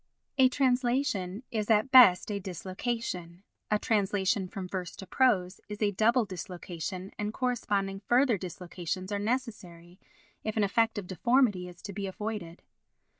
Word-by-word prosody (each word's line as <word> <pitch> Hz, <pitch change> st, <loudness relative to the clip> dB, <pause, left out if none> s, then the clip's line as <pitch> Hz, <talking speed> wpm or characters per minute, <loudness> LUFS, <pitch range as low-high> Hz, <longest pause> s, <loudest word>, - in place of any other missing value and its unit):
A 260 Hz, -1 st, +7 dB
translation 250 Hz, -6 st, 0 dB
is 215 Hz, -2 st, -2 dB
at 220 Hz, +4 st, +3 dB
best 220 Hz, -7 st, +7 dB
a 200 Hz, -, -2 dB
dislocation, 185 Hz, -1 st, -4 dB, 0.3 s
a 210 Hz, -, +3 dB
translation 200 Hz, -2 st, +1 dB
from 185 Hz, 0 st, -6 dB
verse 180 Hz, -1 st, -5 dB
to 190 Hz, -, -9 dB
prose 190 Hz, -4 st, +1 dB
is 210 Hz, 0 st, -6 dB
a 210 Hz, -2 st, +2 dB
double 225 Hz, +4 st, +3 dB
dislocation 180 Hz, 0 st, -6 dB
and 210 Hz, 0 st, -1 dB
corresponding 205 Hz, -6 st, -1 dB
further 240 Hz, +2 st, +2 dB
dislocations 180 Hz, +1 st, -5 dB
are 205 Hz, -, -1 dB
necessary 200 Hz, -7 st, -4 dB, 0.4 s
if 215 Hz, 0 st, -3 dB
an 215 Hz, -, +3 dB
effect 225 Hz, +2 st, +2 dB
of 205 Hz, -, -4 dB
deformity 205 Hz, 0 st, +2 dB
is 180 Hz, -1 st, -13 dB
to 200 Hz, -, -6 dB
be 200 Hz, 0 st, -4 dB
avoided. 200 Hz, -4 st, -5 dB
200 Hz, 145 wpm, -29 LUFS, 185-230 Hz, 0.4 s, A